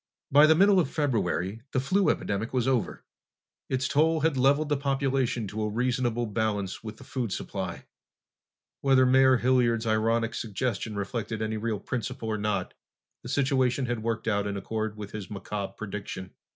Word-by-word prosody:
By 145 +2 +7
the 160 - +6
middle 195 +2 +5
of 160 - +1
February 110 - -1
the 130 - +2
flu 185 +6 +2
epidemic 105 0 -1
was 125 -1 +1
over. 130 -4 0 0.7
Its 130 -1 0
toll 160 +2 +2
had 160 -1 +2
leveled 140 +4 +3
the 145 - +2
population 135 -4 0
to 110 +2 -4
a 105 - 0
reasonable 120 +1 0
balance 105 -3 -2
with 110 -1 -7
the - - -12
food 120 -6 -3
supply. - - -4 0.9
Whether 135 -2 +4
Mayor 130 0 +5
Hilliard's 120 -2 +2
ironic 115 +1 +1
suggestion 110 0 -3
reflected 110 +2 -3
any 110 0 -2
real 110 -1 -2
principle 120 -2 -4
or 110 -1 -1
not, 105 0 -1 0.5
the - - -9
situation 130 -2 +1
had 120 -2 -2
worked 115 0 -2
out 100 -2 +1
in 100 0 -3
accord 110 +1 -3
with 105 -1 -7
his 105 -4 -7
macabre 100 -1 -5
prediction. 100 -3 -6
115 Hz, 165 wpm, -27 LUFS, 105-130 Hz, 0.9 s, By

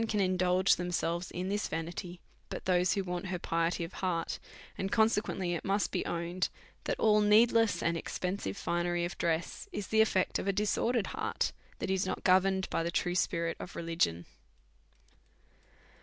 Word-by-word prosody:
87 225 - -1
can 185 -2 +2
indulge 185 +1 +3
themselves 175 0 -1
in 180 +1 -4
this 205 +1 -1
vanity 175 +2 -5 0.3
but - - -6
those 180 0 +3
who 195 - -1
want 180 0 -4
her 180 0 -2
piety 170 +1 0
of 165 - -7
heart; 170 -3 -2 0.4
and 190 +1 -3
consequently 210 -5 +2
it 170 - -3
must 200 +1 0
be 185 - -1
owned, 170 +2 -1 0.4
that - - -1
all 210 -1 +5
needless 225 +1 +4
and 170 0 +1
expensive 180 - -3
finery 175 0 0
of 175 - -5
dress 165 0 -1
is 205 -2 -5
the 220 0 +5
effect 190 -4 +2
of - - -4
a 195 - +2
disordered 210 +2 +1
heart, - - -1 0.3
that 190 - -2
is 190 0 +1
not 185 - -3
governed 190 +1 +3
by - - +1
the 165 - -1
true 175 +1 0
spirit 170 -2 0
of 175 - -8
religion. 165 - 0
180 Hz, 170 wpm, -31 LUFS, 170-195 Hz, 0.4 s, all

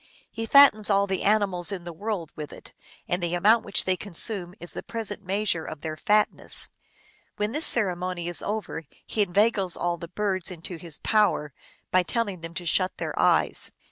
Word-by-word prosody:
He 225 0 -4
fattens 225 -6 +7
all 200 -1 +4
the 190 -2 -2
animals 200 -3 +1
in 190 -3 -5
the 170 0 -7
world 185 -2 -4
with 150 -1 -6
it, - - -11 0.3
and 175 +1 -1
the 175 0 -1
amount 215 +5 +4
which 200 - +1
they 185 - +1
con 190 0 -9
sume 180 -2 -1
is 175 - -5
the - - -5
present 220 -3 -5
measure 190 -3 0
of 155 - -7
their 155 -1 -4
fatness. 210 +6 +1 0.7
When 210 +1 -1
this 305 +5 +2
ceremony 180 -5 0
is 175 - -1
over, 205 -6 -4 0.2
he 215 - -1
inveigles 200 -1 +2
all 175 0 -1
the 170 0 -8
birds 190 -1 -1
into 175 0 -7
his 165 -1 -4
power 205 -9 +2 0.4
by 185 - +5
telling 200 -1 -2
them 165 0 -8
to 175 - -4
shut 185 +2 +1
their - - -3
eyes. - - +2
185 Hz, 190 wpm, -26 LUFS, 175-210 Hz, 0.7 s, fattens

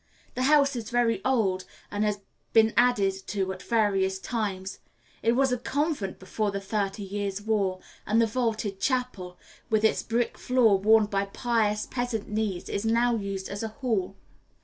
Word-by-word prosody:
The 255 - -3
house 285 -2 +4
is 230 -2 -5
very 230 -4 +1
old, 205 -8 +1 0.3
and 205 +1 -1
has 210 -1 -1 0.3
been 225 0 +5
added 235 -6 +3
to 190 -2 -1
at 185 - -10
various 195 -4 +1
times. 195 -3 -3 0.4
It 230 - +3
was 265 +1 +2
a 250 - 0
convent 280 - -2
before 205 +3 -2
the 200 0 -3
Thirty 200 0 -2
Years' 200 0 -3
War, 205 -3 0 0.3
and 220 +2 +3
the 230 - +5
vaulted 220 -4 -2
chapel, 220 -8 -2 0.3
with 220 -1 +2
its 220 - +3
brick 235 +1 -1
floor 235 -6 +3
worn 215 +2 +5
by 200 -1 -1
pious 210 -1 0
peasant 245 -4 -3
knees, 210 -4 -2
is 200 - -2
now 235 +2 +2
used 195 -3 -4
as 200 +1 -5
a 225 - -2
hall. 215 -5 -2
215 Hz, 170 wpm, -27 LUFS, 195-235 Hz, 0.4 s, been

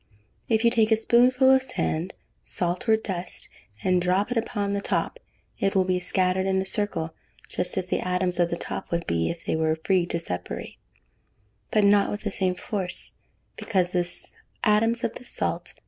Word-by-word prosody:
If 225 0 +2
you 235 - +5
take 225 -2 +2
a - - +7
spoonful 250 +3 +4
of 265 0 +5
sand, 180 -8 -2 0.3
salt, 180 +7 -1
or 220 - +6
dust, 185 -5 -4 0.3
and 185 -1 +2
drop 185 +5 +1
it - - 0
upon 205 -3 -1
the 200 - -1
top, - - -1 0.4
it 195 - 0
will 190 - +4
be 185 0 0
scattered 185 +1 +1
in 190 0 +2
a 190 - -1
circle, 185 -5 0 0.4
just 180 - -1
as 185 - 0
the - - 0
atoms 180 0 -1
of 175 -1 +3
the 170 - -2
top - - -5
would 170 0 -1
be, 85 0 0
if 170 0 -6
they - - 0
were 160 0 +1
free 185 -3 +2
to 170 - -1
separate, 90 - -4 0.9
but 215 - +2
not 200 0 +4
with 205 - -4
the 205 - -3
same 185 -2 0
force, 185 -1 -2 0.5
because 185 -5 0
the 180 -1 0 0.5
atoms 225 +2 +3
of - - -1
the - - -10
salt, - - -1
&c. - - -8
190 Hz, 195 wpm, -25 LUFS, 180-215 Hz, 0.9 s, a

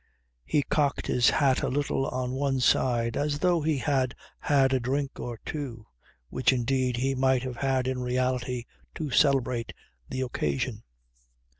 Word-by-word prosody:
He 145 - +1
cocked 145 -1 0
his 120 -1 +3
hat 135 -3 +2
a - - 0
little 140 -1 0
on 125 0 -2
one 135 0 0
side 120 -2 +2
as 145 0 0
though 175 +1 +2
he 155 -1 +1
had 130 -2 0 0.2
had 135 -2 +3
a 130 - +3
drink 135 +3 -2
or 120 -2 -5
two 125 -8 -5 0.4
which 130 - +2
indeed 125 0 0
he 135 +2 0
might 130 -1 +2
have 130 -2 -5
had 130 -2 0
in 130 -1 -2
reality, 125 0 -1 0.3
to 150 -4 -4
celebrate 130 -4 +2 0.4
the 130 - -3
occasion. 75 - -2
130 Hz, 155 wpm, -27 LUFS, 125-140 Hz, 0.4 s, his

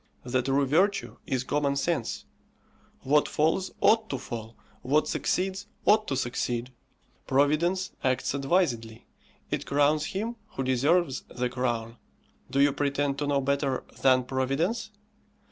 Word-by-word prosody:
The 130 +1 0
true 135 +2 +1
virtue 185 +9 +1
is 130 -1 0
common 140 +1 0
sense 140 -3 -1 0.8
what 145 +2 +3
falls 165 +5 +1
ought 220 0 +4
to 135 - -2
fall, 115 -2 -7 0.2
what 145 +4 +2
succeeds 190 +2 -1 0.2
ought 215 +1 +4
to 135 - -1
succeed. 120 -1 -2 0.6
Providence 155 +7 +2
acts 130 0 +1
advisedly, 135 -7 0 0.5
it - - -2
crowns 145 +2 +2
him 225 +5 -3 0.2
who 135 - -1
deserves 135 +4 +2
the 125 0 -2
crown; 120 -2 -2 0.5
do 135 - 0
you 140 0 +5
pretend 140 -1 0
to 145 - -1
know 140 -1 +2
better 140 -1 0 0.2
than 130 -1 +5
Providence? 135 - -1
140 Hz, 130 wpm, -27 LUFS, 130-165 Hz, 0.8 s, you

